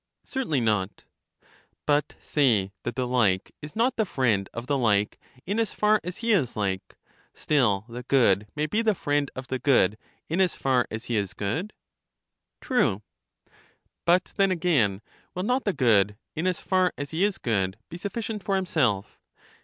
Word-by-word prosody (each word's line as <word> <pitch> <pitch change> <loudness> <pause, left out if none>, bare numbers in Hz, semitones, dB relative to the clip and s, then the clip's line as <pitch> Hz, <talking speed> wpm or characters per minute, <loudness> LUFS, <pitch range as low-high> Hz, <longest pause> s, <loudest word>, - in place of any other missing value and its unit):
Certainly 240 - -1
not. 105 -3 0 0.8
But 145 0 +1
say 115 -10 +2
that 120 -1 -4
the 130 0 -1
like 110 -7 +1
is 150 0 -9
not 240 +3 +1
the 220 - +3
friend 110 - +1
of 115 +1 -6
the 140 - 0
like 105 -5 +1 0.3
in 205 +5 -1
as 225 -3 0
far 210 0 +3
as 180 +1 -6
he 230 - +3
is 150 - +2
like; 95 -2 -2 0.4
still 110 -9 +1
the 120 +1 -7
good 115 -6 +3
may 150 0 0
be 210 +9 0
the 220 -3 +2
friend 145 -3 0
of 130 0 -7
the 130 - -2
good 110 -7 +3 0.3
in 170 +4 0
as 185 -3 +2
far 130 -2 +1
as 110 +1 -5
he 120 -2 -1
is 100 -3 -2
good. 160 - -2 0.9
True. 120 - +1 1.0
But 175 +2 +2
then 195 -1 +4
again, 140 - +1 0.3
will 180 - -2
not 250 +5 0
the 205 - +2
good, 105 - +3 0.2
in 160 +4 -1
as 185 - 0
far 185 -2 +2
as 145 0 -5
he 165 +4 0
IS 205 -1 +1
good, 95 -4 -1
be 170 - -9
sufficient 210 +1 -4
for 195 - 0
himself? 135 - 0
135 Hz, 175 wpm, -26 LUFS, -, 1.0 s, then